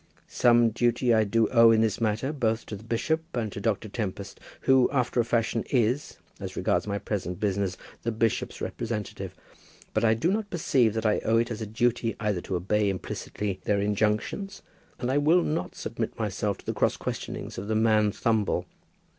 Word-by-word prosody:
"Some 120 -1 +4
duty 120 +1 +2
I 110 -1 +4
do 115 +2 +2
owe 115 -2 +7
in 110 -1 +5
this 110 -1 0
matter, 115 +6 0
both 115 -5 0
to 105 - -6
the 100 - -11
bishop, 120 +8 0 0.2
and 110 -3 -1
to 100 - -6
Dr. 110 0 0
Tempest, 100 -2 -5 0.2
who, 130 -2 +4
after 125 -2 0
a - - +5
fashion, 115 0 0
is, 125 +2 +1 0.2
as - - -6
regards - - 0
my 100 0 -1
present 95 -3 -3
business, 100 -2 -1 0.2
the 115 - -1
bishop's 110 0 -1
representative. 110 -3 -4 0.6
But - - +1
I 110 -1 +4
do 145 +11 +1
not 210 0 -1
perceive 130 - +2
that 110 0 -2
I 105 - +3
owe 115 +1 +2
it 115 +1 +1
as 115 0 -4
a 110 - -3
duty 115 +1 0
to - - -11
either 100 -4 0
to 95 - -4
obey 100 +4 +1
implicitly 95 +1 -4
their 100 -1 +2
injunctions, 105 - -1 0.3
and 125 0 -2
I 140 - +3
will 165 +4 +4
not 155 +2 -2
submit - - -4
myself - - -1
to - - -18
the - - -2
cross - - +1
questionings - - -5
of 100 - -6
the 110 - 0
man 110 -1 +3
Thumble. 110 -1 0
110 Hz, 195 wpm, -27 LUFS, 105-120 Hz, 0.6 s, owe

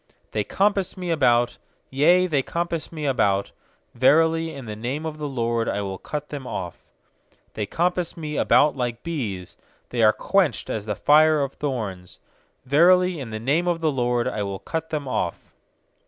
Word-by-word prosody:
uThey 105 -1 -2
compass 195 -2 +1
me 180 -2 -3
about, 120 -6 +2 0.3
yea, 170 +7 +4
they 150 -6 +1
compass 170 +2 -3
me 155 -3 -5
about; 100 -8 +1 0.4
Verily, 160 +6 +3
in 135 -5 -9
the 105 -1 -6
name 130 +8 -4
of 155 -1 -5
the 150 - -3
LORD 115 -3 -1
I 100 - -2
will 95 -1 -5
cut 150 -1 -5
them 140 -3 -6
off. 90 -7 -6 0.7
12They 105 -2 -4
compass 175 0 -1
me 155 -2 -5
about 145 +1 +4
like 120 -2 -3
bees;, 110 - -4 0.3
They 120 - -1
are 110 -1 +7
quenched 195 - 0
as 105 -1 -4
the 105 - -1
fire 155 +2 +4
of 140 - -4
thorns; 105 -11 -5 0.5
Verily, 180 +5 +4
in 130 -4 -6
the 110 0 -5
name 145 +10 +1
of 175 -1 +1
the 160 -2 +1
LORD 120 -2 0
I 105 - -2
will 100 -1 -3
cut 160 - -5
them 150 -3 -3
off. - - -3
140 Hz, 175 wpm, -23 LUFS, 115-165 Hz, 0.7 s, are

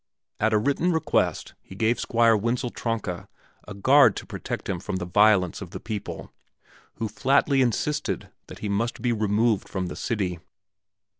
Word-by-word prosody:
At 110 +1 +2
a 110 - +4
written 140 +10 +1
request 160 -1 0
he 95 - -13
gave 110 +4 +1
Squire 115 -1 +3
Wenzel 120 +3 -1
Tronka 110 -7 -4 0.4
a 105 - -8
guard 135 +9 +5
to - - -6
protect - - -6
him 95 -3 -2
from 95 - -4
the 90 -1 -3
violence 95 -1 +3
of 95 - -7
the - - -7
people, 110 -3 -6 0.6
who 115 - -3
flatly 135 +3 +2
insisted 125 - -1 0.2
that - - -10
he - - 0
must 110 +5 -2
be 120 -1 +2
removed 110 0 +1
from 95 -2 -3
the - - -6
city. 95 -6 -2
110 Hz, 165 wpm, -25 LUFS, 100-120 Hz, 0.6 s, guard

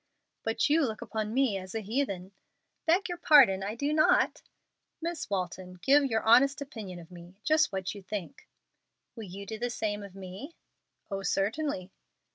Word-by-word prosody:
"But 225 0 +1
you 310 +2 +4
look 220 -5 -2
upon 215 -1 -3
me 245 -5 +2
as 185 +2 -9
a 225 - -1
'heathen.'" 200 -4 -2 0.6
"Beg 350 +5 +3
your 350 -1 -5
pardon, 260 - +6
I 205 +3 -3
do 285 +5 -1
not." 310 0 +3 0.6
"Miss 330 -5 -4
Walton, 185 -1 -3
give 285 +1 +5
your 225 -4 0
honest 270 +5 +5
opinion 220 -10 -7
of 170 0 -12
me 175 +1 -12
just 310 -3 +3
what 190 -1 -3
you 200 - -9
think." 205 +5 -6 0.7
"Will 225 -3 -7
you 195 +2 -8
do 220 +2 -6
the 245 +1 -1
same 210 -3 -2
of 200 -2 -10
me?" 195 - -9 0.6
"Oh, 195 0 -2
certainly!" 195 0 -1
215 Hz, 170 wpm, -29 LUFS, 190-280 Hz, 0.7 s, pardon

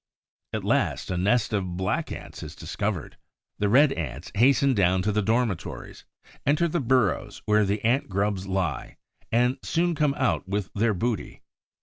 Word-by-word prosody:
At - - -3
last, - - 0
a - - -1
nest 105 +3 +1
of 95 -4 -2
Black 95 0 -1
Ants - - -8
is - - -8
discovered. - - -4 0.4
The 105 - +1
Red 135 +5 +5
Ants 80 +3 -5
hasten 135 +5 +4
down 95 -3 +2
to 105 - +1
the 105 +1 +1
dormitories, 110 -3 -2 0.4
enter 150 +5 +2
the 170 +1 -1
burrows 125 - 0
where 105 0 +3
the 100 +2 -1
Ant 120 +2 +2
grubs 100 0 -1
lie 95 -6 -2 0.3
and 125 +2 +2
soon 175 +1 0
come 150 -2 +1
out 130 -8 0
with 100 -1 -2
their 110 0 +1
booty. 115 +3 -3
105 Hz, 160 wpm, -26 LUFS, 95-130 Hz, 0.4 s, Red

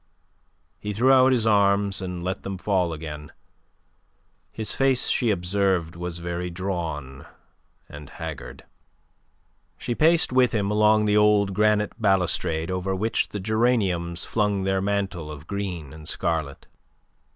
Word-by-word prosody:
He 105 0 -4
threw 125 +6 +3
out 130 0 +6
his 120 -4 +2
arms, 100 -2 +2
and 90 -2 -5
let 95 +2 -3
them 100 -1 -5
fall 90 -2 0
again. 75 -1 -7 1.2
His 110 -2 -3
face 135 -2 +2
she 120 - +1
observed 90 -3 0
was 90 0 -5
very 85 +1 -4
drawn 85 -7 -5 0.6
and 75 -1 -11
haggard. 80 -4 -8 1.1
She 120 - -3
paced 160 +1 +3
with 125 -2 +3
him 100 -2 0
along 105 0 +4
the 105 0 +3
old 105 -2 +3
granite 105 +2 +1
balustrade 90 -4 +1
over 95 +1 -2
which 110 +4 0
the 105 - -5
geraniums 95 -6 0
flung 105 -3 0
their 95 0 0
mantle 95 -5 -2
of 75 0 -10
green 90 -7 -5
and 80 -1 -10
scarlet. 80 -5 -2
95 Hz, 135 wpm, -24 LUFS, 85-105 Hz, 1.2 s, out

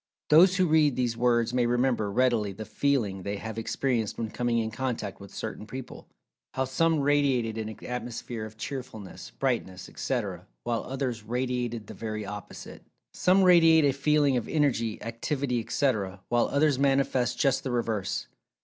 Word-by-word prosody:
Those 180 +5 +7
who 185 - +4
read 155 -4 +3
these 120 -2 0
words 120 -1 +2
may 125 -1 +2
remember, 120 -4 +1
readily, 115 -4 +2
the 110 +3 -7
"feeling" 110 -5 0
they 100 +2 -3
have 110 +2 -5
experienced 115 -1 -1
when 110 -2 -3
coming 120 -1 0
in 110 -1 -1
contact 115 -4 -3
with 100 0 -11
certain 110 -1 -6
people—how 130 +1 -7
some 160 +4 +1
radiated 135 -6 +1
an 110 0 -6
atmosphere 120 -2 -5
of 110 0 -9
cheerfulness, 110 -5 -7
brightness, 115 -9 -2
etc., - - -3 0.2
while 120 -1 -1
others 130 -3 -3
radiated 120 0 -2
the - - -9
very 110 -2 -5
opposite. 105 0 -8 0.3
Some 190 +1 +3
radiate 165 -4 +6
a 140 - +3
feeling 145 -1 +2
of 120 - -3
energy, 120 -8 +1
activity, 125 +3 -2
etc., 105 -6 -1
while 120 0 +2
others 140 -2 +2
manifest 135 -3 +2
just 135 -3 +2
the 130 - -3
reverse. 115 -5 -1
120 Hz, 155 wpm, -28 LUFS, 110-140 Hz, 0.3 s, Those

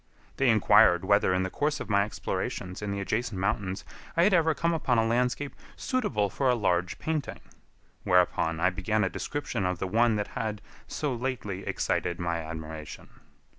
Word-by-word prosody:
They 135 - +3
inquired 95 -4 +5
whether 100 -1 +3
in 90 0 +1
the 95 - -3
course 150 +1 -1
of - - -5
my 100 -1 +3
explorations 90 -3 -4
in 105 - -3
the 100 0 -2
adjacent 110 +1 -2
mountains 95 0 -2 0.3
I 170 - +5
had 195 +2 +4
ever 160 -3 +3
come 170 +4 +1
upon 135 -6 +1
a 115 - +3
landscape 125 +4 0 0.2
suitable 210 - 0
for 130 +7 0
a 125 - +4
large 90 -5 0
painting; 155 -2 -3 0.6
whereupon 85 -2 +2
I 90 +2 +3
began 100 +4 0
a 95 - +1
description 130 -5 -3
of 90 -1 0
the 95 - -3
one 115 +4 +3
that 105 -1 -2
had 110 -3 -3 0.3
so 145 -3 -2
lately 115 -6 -4
excited 85 -1 -1
my 85 -1 -1
admiration. 80 -1 -7
105 Hz, 175 wpm, -28 LUFS, 90-125 Hz, 0.6 s, inquired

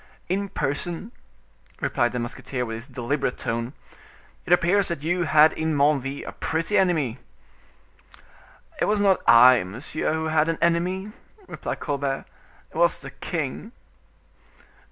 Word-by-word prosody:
"In 200 +2 -1
person," 175 - -3 0.7
replied 120 - 0
the 125 - -4
musketeer 125 +1 -4
with 115 - -5
his 115 +3 -7
deliberate 125 +1 -2
tone; 115 +3 -3 0.7
"it - - -4
appears 180 +3 +4
that 170 -4 -3
you 175 +2 0
had 155 +1 +5
in 160 -1 -1
Menneville 140 -1 +1
a - - -6
pretty 165 +6 -2
enemy." 160 - +2 1.6
"It - - +2
was 210 0 +1
not 195 -2 +3
I, 120 -1 +8
monsieur, 120 +13 -3
who 160 0 -1
had 155 0 +2
an 165 - 0
enemy," 180 +4 0 0.3
replied - - -6
Colbert; 140 -2 -2 0.5
"it - - -8
was - - +3
the - - -9
king." 165 - -5
155 Hz, 135 wpm, -24 LUFS, 130-175 Hz, 1.6 s, I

